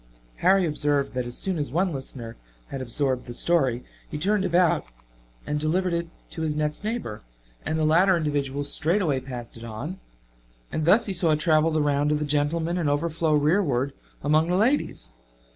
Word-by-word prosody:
Harry 190 - +4
observed 145 -3 0
that 125 -1 -2
as 120 - -2
soon 185 -4 -1
as 145 - -2
one 175 +4 0
listener 130 -4 -7 0.3
had 135 - -5
absorbed 130 +1 -1
the 120 - -6
story, 130 -8 +2 0.3
he - - -4
turned 195 +5 +1
about 175 -2 +2 0.6
and 150 0 -1
delivered 175 +4 0
it 170 0 -1 0.2
to 160 - -6
his 155 -2 -1
next 150 +3 -2
neighbor 215 - -4 0.5
and 155 - 0
the 155 - +1
latter 180 +4 +4
individual 145 -3 -1
straightway 155 0 +1
passed 125 -3 -8
it 115 - -11
on. 120 - -6 0.7
And 155 - -1
thus 205 +8 +5
he 195 - -2
saw 170 -3 +2
it 150 - 0
travel 155 -1 +3
the 155 -1 +1
round 145 0 +1
of 150 - +2
the 150 - -2
gentlemen 160 +4 0
and 155 -4 +1
overflow 160 +2 0
rearward 145 -4 +2 0.3
among 155 +3 +3
the 180 - +2
ladies. 215 - 0
155 Hz, 180 wpm, -25 LUFS, 140-170 Hz, 0.7 s, thus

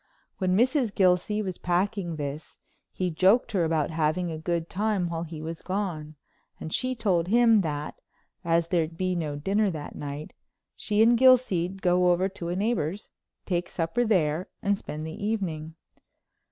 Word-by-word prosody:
When 185 -1 +2
Mrs. 250 -1 +2
Gilsey 190 +3 +2
was 185 -3 -5
packing 180 0 -1
this 145 0 -6 0.3
he 180 -1 -2
joked 195 +9 +3
her 190 -5 +1
about 160 -1 0
having 160 +2 0
a 160 - -4
good 170 0 -2
time 200 -2 -1
while 165 -1 -3
he 160 -2 -7
was 165 +1 -6
gone, 175 -6 -3 0.4
and 160 - -6
she 255 0 -1
told 185 -7 +1
him 230 +2 +5
that, 150 -3 -4 0.4
as 170 -1 +1
there'd 165 -2 0
be 185 0 0
no 155 -4 -2
dinner 195 +8 +1
that 155 -4 -6
night, 145 +1 -7 0.4
she 215 +1 +2
and 235 +1 +5
Gilsey'd 215 -8 +3
go 180 0 +4
over 180 +2 +2
to 175 -3 -6
a 175 - -1
neighbor's, 205 -2 -2 0.3
take 175 -2 -1
supper 165 +8 -1
there 180 -6 +1
and 200 -1 +2
spend 155 -5 -7
the 160 +5 -7
evening. 165 -7 -3
180 Hz, 165 wpm, -27 LUFS, 160-205 Hz, 0.4 s, him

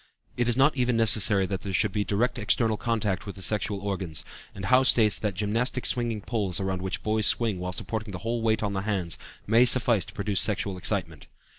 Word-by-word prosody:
It 120 -1 -1
is 120 0 +1
not 135 +2 +3
even 125 -3 0
necessary 105 -3 +3
that 95 0 -4
there 100 - -5
should 105 +2 +1
be 105 0 -1
direct 120 +6 -1
external 110 +1 +1
contact 105 -4 -2
with 100 - -7
the 95 - -4
sexual 105 -1 +1
organs, 95 -6 -4 0.3
and 95 - -6
Howe 125 +6 +4
states 115 -5 +4
that 105 -3 -3
gymnastic 115 +6 -1
swinging 120 -3 -1
poles 100 -5 -2
around 95 -1 -3
which 95 0 -3
boys 110 0 +3
swing 110 -6 +2
while 90 0 -4
supporting 110 +3 -4
the 90 - -6
whole 115 0 -2
weight 110 -1 0
on 100 -1 -2
the 95 - -2
hands, 95 -5 -2 0.3
may 115 +3 +4
suffice 120 -4 +4
to - - -12
produce 100 -2 -1
sexual 100 -2 0
excitement. 90 -4 -3
105 Hz, 210 wpm, -26 LUFS, 95-115 Hz, 0.3 s, Howe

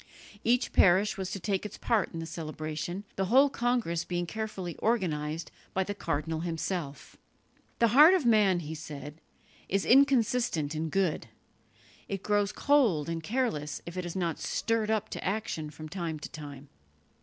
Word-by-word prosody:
Each 245 +2 +2
parish 195 +3 +5
was 190 -2 -4
to 195 - -4
take 195 0 -1
its 210 - -7
part 225 -4 +1
in 165 - -7
the 165 - -4
celebration, 160 +3 -5
the 195 - +1
whole 265 +7 +5
congress 235 -10 0
being 175 0 -2
carefully 195 -3 -5
organized 165 -8 -1 0.2
by 190 - +2
the 205 - -4
cardinal 160 -4 -2
himself. 165 -3 -4 0.6
"The 230 - +4
heart 300 - +8
of 345 -8 0
man," 205 -6 +4
he 155 0 -6
said, 150 -1 -8 0.5
"is 195 +1 +1
inconstant 245 - +3
in 160 +1 -2
good; 175 -8 0 0.8
it 195 -1 -4
grows 205 -1 +1
cold 225 - +2
and 165 0 -3
careless 160 - -2
if 170 - -8
it 185 - -3
is 175 0 -6
not 170 -4 -1
stirred 225 0 -1
up 220 -1 0
to - - -6
action 190 -6 -2
from 155 +1 -9
time 170 -2 -4
to 150 - -8
time." 145 -2 -9
185 Hz, 165 wpm, -29 LUFS, 160-220 Hz, 0.8 s, heart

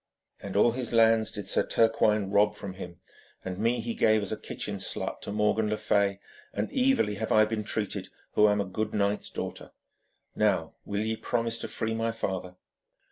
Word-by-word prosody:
And 100 -1 -7
all 110 +4 +5
his 120 -1 -4
lands 115 -1 +4
did 105 -3 -6
Sir - - +2
Turquine 110 -3 +2
rob 105 +1 +4
from 100 -2 -7
him, 90 -2 -9 0.5
and 95 0 -4
me 115 +3 +1
he 115 0 -3
gave 110 -2 +3
as 100 - -4
a - - 0
kitchen - - -5
slut - - -2
to - - -5
Morgan 105 +1 +1
le 105 - 0
Fay, 100 -2 +1 0.3
and 105 +1 -3
evilly 260 - +3
have 110 +1 -3
I 110 0 +6
been 110 0 -2
treated 105 -1 -3 0.2
who 105 - +5
am 105 0 +2
a 100 - 0
good 105 +3 -3
knight's 100 0 0
daughter. - - -6 0.6
Now, - - +1
will 100 0 -2
ye 110 +1 -1
promise 115 0 -1
to - - -4
free 110 -1 -2
my 115 0 0
father?' 95 -5 -4
105 Hz, 190 wpm, -28 LUFS, 100-115 Hz, 0.6 s, I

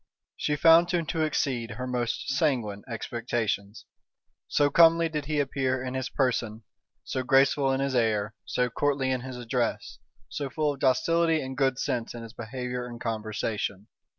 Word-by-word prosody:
She 150 - -1
found 165 +3 +6
him 175 -2 0
to 160 +1 -2
exceed 135 -6 0
her 125 +2 -5
most 125 -2 -2
sanguine 125 -8 0
expectations; 115 -3 -3 0.6
so 145 -1 +2
comely 165 0 +6
did 150 -2 -3
he 150 0 -1
appear 130 -2 0
in 130 0 -4
his 130 0 -3
person, 115 -4 -1 0.4
so 130 - -3
graceful 135 +1 +3
in 135 0 0
his 135 -1 -1
air, 110 -3 +1
so 125 - 0
courtly 135 0 0
in 130 -1 -1
his 130 0 -7
address, 115 -4 -2 0.3
so 135 +7 -4
full 150 0 0
of 140 - -12
docility 165 +5 +2
and 130 -2 -5
good 135 -1 +1
sense 120 -3 -2
in 120 - -7
his 115 -1 -10
behavior 125 +1 -5
and 120 -1 -9
conversation. 110 -2 -3
130 Hz, 165 wpm, -27 LUFS, 115-145 Hz, 0.6 s, found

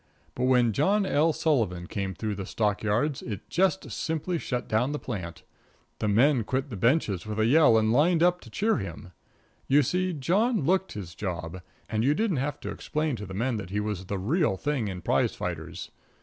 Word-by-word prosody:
But 125 - -1
when 125 -3 +3
John 200 - +2
L. 160 -2 +3
Sullivan 110 - 0
went 95 -4 -2
through 110 +3 -2
the 95 -1 -6
stock 105 -2 0
yards 120 +7 0
it 105 -5 -6
just 190 +1 +1
simply 160 +1 -2
shut 125 -4 -3
down 125 +6 +1
the - - -1
plant. 90 - -6 0.6
The 110 - -1
men 120 +4 +4
quit 130 +5 -2
the - - -4
benches 105 - +1
with 110 0 -3
a 110 - +3
yell 140 -2 +6
and 110 0 +2
lined 165 +5 +4
up 180 0 +3
to - - -13
cheer 220 +2 +1
him. 90 -2 -7 0.6
You 145 +2 +5
see, 185 +7 0
John 195 - +1
looked 190 +6 +1
his 95 -6 -7
job, 90 -2 -5 0.3
and 110 0 -1
you 145 +4 +3
didn't 210 -4 0
have 145 +2 -2
to - - -4
explain 155 -2 -2
to 105 - -7
the 95 - -7
men 115 +3 0
that 100 -4 -6
he 100 +2 -1
was 105 -3 -3
the 100 - -2
real 120 - +1
thing 140 -5 -1
in 90 -3 -6
prize - - +1
fighters. - - -5
125 Hz, 205 wpm, -27 LUFS, 105-155 Hz, 0.6 s, yell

